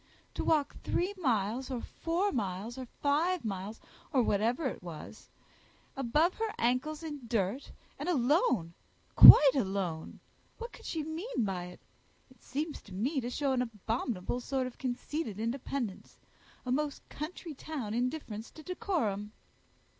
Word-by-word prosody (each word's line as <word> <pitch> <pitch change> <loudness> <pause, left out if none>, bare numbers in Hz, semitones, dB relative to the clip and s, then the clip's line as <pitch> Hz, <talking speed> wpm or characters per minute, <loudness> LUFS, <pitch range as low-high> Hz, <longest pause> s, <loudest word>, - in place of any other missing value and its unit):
"To - - -3
walk 300 -3 +2
three 370 +3 0
miles, 245 - 0
or 255 -3 -2
four 345 - -1
miles, 210 0 -3
or 260 -1 -7
five 305 +5 0
miles, 200 +1 -4 0.3
or 265 -5 +3
whatever 230 +9 +1
it 260 - -2
is, 165 -4 -9 0.7
above 295 +7 +2
her 445 -1 0
ancles 265 +7 0
in 295 -6 -6
dirt, 225 +3 -1 0.3
and - - -2
alone, 250 - +2 0.4
quite 275 -3 +12
alone! 190 - -2 0.4
what 470 +1 -7
could - - -13
she 320 -2 -2
mean 320 - -2
by 185 -3 -3
it? 180 - -11 0.5
It 255 - -21
seems 300 +4 -4
to 190 - -11
me 265 - 0
to 240 - -3
show 275 +2 0
an 255 -1 +2
abominable 230 -1 -2
sort 260 +1 -1
of 255 - -8
conceited 255 -2 -3
independence, 235 -2 -4 0.5
a 250 - -2
most 290 +1 -1
country 315 +2 -6
town 270 -7 -5
indifference 240 -3 -3
to 315 - -13
decorum." 295 - -2
255 Hz, 145 wpm, -31 LUFS, 215-305 Hz, 0.7 s, quite